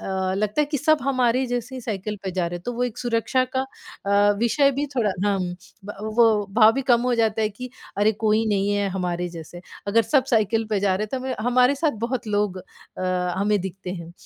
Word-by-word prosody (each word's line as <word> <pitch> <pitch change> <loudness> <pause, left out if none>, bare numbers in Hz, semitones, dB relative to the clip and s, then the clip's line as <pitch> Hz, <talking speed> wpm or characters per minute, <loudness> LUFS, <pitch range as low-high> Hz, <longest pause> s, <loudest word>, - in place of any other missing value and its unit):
अ, 190 -1 -2
लगता 210 +7 0
है - - -1
कि 295 -1 -2
सब 310 +2 +3
हमारे 255 -1 +2
जैसी 245 +1 -4
साइकिल 210 -2 -4
पे 190 - -3
जा 180 -2 0
रहे 175 +1 -4
तो 215 +8 -5
वो 245 +1 -2
एक 245 0 -5
सुरक्षा 240 +1 +1
का 260 - +2 0.4
अ, 205 +1 +4
विषय 275 +5 +3
भी 280 +2 -2
थोड़ा 215 -4 +2 0.2
हम्म, 185 -3 0 0.3
ब 205 - -7 0.2
वो 215 -3 +4
भाव 220 -1 +7
भी 270 +3 -2
कम 235 - +5
हो 250 -1 +1
जाता 220 -1 +1
है 215 - +2
कि 250 +4 -9 0.3
अरे! 215 +2 +4
कोई 215 +1 +1
नहीं 200 -1 +1
है 200 -1 0
हमारे 180 -1 -2
जैसे। 170 +1 -10 0.3
अगर 230 +3 +4
सब 265 +3 +2
साइकिल 225 0 +2
पे 205 -2 +1
जा 195 -2 +2
रहे 210 - -2
हैं - - -9
तो 265 - -1
हमे 260 - -2
हमारे 250 +2 +4
साथ 295 +1 0
बहुत 250 -2 -3
लोग 205 -2 0
अ, - - -9 0.8
हमें 205 0 +2
दिखते 190 0 -6
हैं 170 -1 -9
215 Hz, 225 wpm, -23 LUFS, 195-245 Hz, 0.8 s, भाव